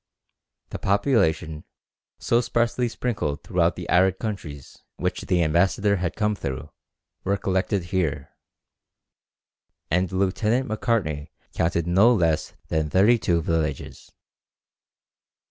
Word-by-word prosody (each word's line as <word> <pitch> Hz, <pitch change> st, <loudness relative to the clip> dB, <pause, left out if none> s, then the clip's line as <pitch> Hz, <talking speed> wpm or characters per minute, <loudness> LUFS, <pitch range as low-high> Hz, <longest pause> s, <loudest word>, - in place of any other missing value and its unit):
The -, -, -5 dB
population, 80 Hz, -, +1 dB, 0.5 s
so 120 Hz, -, +2 dB
sparsely 120 Hz, +1 st, 0 dB
sprinkled 105 Hz, -13 st, -3 dB
throughout -, -, +1 dB
the -, -, -7 dB
arid 95 Hz, +1 st, +3 dB
countries 80 Hz, -, -6 dB, 0.2 s
which -, -, -2 dB
the 90 Hz, -2 st, +1 dB
ambassador 95 Hz, +5 st, +2 dB
had 90 Hz, -1 st, -2 dB
come 105 Hz, -1 st, +1 dB
through, 70 Hz, -5 st, -5 dB, 0.5 s
were 100 Hz, +1 st, 0 dB
collected 95 Hz, 0 st, -1 dB
here, 85 Hz, -6 st, -2 dB, 1.6 s
and 90 Hz, +1 st, +1 dB
Lieut. 95 Hz, 0 st, -1 dB, 0.2 s
Macartney 105 Hz, -, -1 dB, 0.2 s
counted 85 Hz, 0 st, 0 dB
no 95 Hz, +7 st, +5 dB
less 85 Hz, -6 st, 0 dB
than 80 Hz, -1 st, 0 dB
thirty 105 Hz, +8 st, +4 dB
two 85 Hz, -4 st, +1 dB
villages. 80 Hz, -2 st, -3 dB
95 Hz, 110 wpm, -24 LUFS, 80-105 Hz, 1.6 s, no